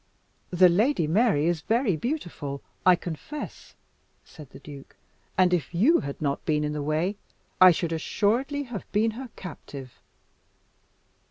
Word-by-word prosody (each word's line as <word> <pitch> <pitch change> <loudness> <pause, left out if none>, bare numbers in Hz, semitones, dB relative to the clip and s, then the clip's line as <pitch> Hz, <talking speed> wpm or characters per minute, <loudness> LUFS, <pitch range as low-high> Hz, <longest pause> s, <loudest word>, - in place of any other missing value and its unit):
"The 180 0 +6
Lady 200 - +2
Mary 170 -2 +2
is 170 -1 0
very 230 -3 +1
beautiful, 160 - -4 0.2
I 180 - +8
confess," 175 - -8 0.5
said 150 -5 -13
the - - -13
duke; 140 -1 -12 0.4
"and 180 -1 +4
if 170 -1 -1
you 255 - +4
had 140 0 -6
not 140 -2 -2
been 150 -1 0
in 150 0 -2
the 150 - -3
way, 155 +7 -1 0.4
I 185 - +11
should 170 -1 0
assuredly 240 - 0
have 240 -8 -8
been 220 +2 +2
her 250 +3 -8
captive." 140 -7 -9
175 Hz, 145 wpm, -26 LUFS, 150-225 Hz, 0.5 s, I